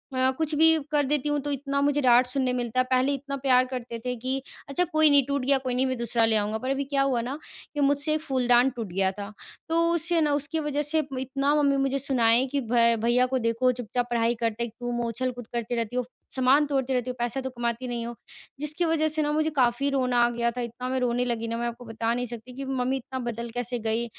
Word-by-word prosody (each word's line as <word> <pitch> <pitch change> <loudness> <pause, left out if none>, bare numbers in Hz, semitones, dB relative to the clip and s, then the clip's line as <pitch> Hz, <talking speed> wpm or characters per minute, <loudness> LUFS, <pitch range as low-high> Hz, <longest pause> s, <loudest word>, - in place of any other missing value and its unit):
अ, 260 0 +3
कुछ 315 -1 -1
भी 320 +1 +6
कर 295 -1 +2
देती 295 +1 0
हूँ। 295 0 +1
तो 290 +1 -3
इतना 280 0 -2
मुझे 290 0 +2
डाँट 250 -1 +5
सुनने 255 -1 0
मिलता 245 0 -1
है - - +5
पहले 260 +2 +3
इतना 280 0 -4
प्यार 255 -1 +3
करते 235 -2 -5
थे 250 0 -1
कि 260 +3 -3 0.3
अच्छा 280 +6 +1
कोई 310 -3 +4
नहीं 280 -2 +5
टूट 280 0 -1
गया, 275 +1 +4
कोई 260 -1 -3
नहीं 255 +1 +2
मैं 260 -1 -1
दूसरा 235 -1 +1
ले 225 0 +2
आऊँगा। 210 +1 0
पर 255 +4 -4
अभी 275 +1 0
क्या 275 0 0
हुआ 265 -4 +1
ना 260 +5 -4 0.4
कि 295 - -4
मुझसे 285 +2 +2
एक 310 - -1
फूलदान 250 -3 +3
टूट 230 -4 -4
गया 190 0 +2
था 200 +2 -7 0.4
तो 330 +1 +3
उससे 335 0 +1
ना 295 -1 +2
उसकी 295 +3 -2
वज़ह 295 -1 -1
से 310 +1 0 0.2
इतना 275 +2 0
मम्मी 280 -1 +3
मुझे 275 0 0
सुनाए 245 -2 +3
कि 280 - +2
भ 235 -1 +2 0.2
भैया 240 +2 +3
को 260 0 0
देखो 230 +2 +2
चुपचाप 245 0 -3
पढ़ाई 235 0 +1
करते 230 0 -2
हैं 235 - -5
तुम 245 0 -3
हो 235 - -1
उछल-कूद 245 0 -4
करती 235 0 -2
रहती 230 0 -3
हो। 250 -1 0 0.3
सामान 265 +3 +4
तोड़ती 270 -2 0
रहती 250 0 -1
हो 250 - -4
पैसा 240 +3 -1
तो 260 - -4
कमाती 240 0 -3
नहीं 235 -1 -3
हो 235 - -5 0.5
जिसकी 300 +4 -1
वज़ह 320 -1 +2
से 310 0 -1
ना 295 0 0
मुझे 310 +1 +1
काफ़ी 265 -1 +1
रोना 255 -3 +1
आ - - +2
गया 235 0 0
था। 250 +1 -5
इतना 240 +1 -5
मैं 260 0 0
रोने 245 0 +1
लगी 230 -2 -2
ना 230 0 -3
मैं 240 0 -1
आपको 235 +1 -7
बता 225 0 -1
नहीं 245 +1 -2
सकती 235 +1 -9
कि 275 +1 -5
मम्मी 265 0 -1
इतना 260 0 -6
बदल 235 -1 -4
कैसे 245 0 -3
गई 225 +1 -1
255 Hz, 255 wpm, -26 LUFS, 235-280 Hz, 0.5 s, भी